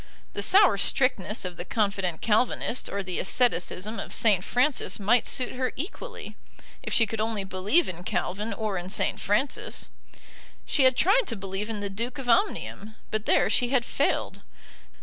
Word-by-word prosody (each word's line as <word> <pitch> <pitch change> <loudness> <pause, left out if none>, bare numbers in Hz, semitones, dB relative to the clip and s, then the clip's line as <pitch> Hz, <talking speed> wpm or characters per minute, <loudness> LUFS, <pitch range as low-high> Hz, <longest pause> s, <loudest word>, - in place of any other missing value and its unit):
The - - -3
sour 385 - +5
strictness 210 -4 +1
of 180 -1 -5
the - - -4
confident 195 -5 -1
Calvinist 230 +2 0
or 200 0 -3
the 185 -2 -3
asceticism 215 -1 0
of - - -6
St. 205 -5 +3
Francis 250 -5 0
might 220 +4 +3
suit 255 -2 0
her 255 0 -2
equally, 435 - -7 0.5
if - - -6
she 230 - +4
could 220 +1 -4
only 220 -2 -1
believe 190 - +1
in 175 -1 -6
Calvin 205 +5 -2
or 215 -4 -2
in 175 +1 -7
St. - - -1
Francis. 215 +8 -2 0.8
She 275 - +2
had 260 -1 +4
tried 420 +8 +4
to 230 - -3
believe 195 +1 -5
in 215 -2 -4
the 200 - -2
Duke 235 +7 -4
of 270 -3 -7
Omnium, 230 - 0 0.2
but 215 0 -2
there - - +4
she 245 - +2
had 250 -3 +1
failed. - - -1
215 Hz, 170 wpm, -26 LUFS, 195-255 Hz, 0.8 s, sour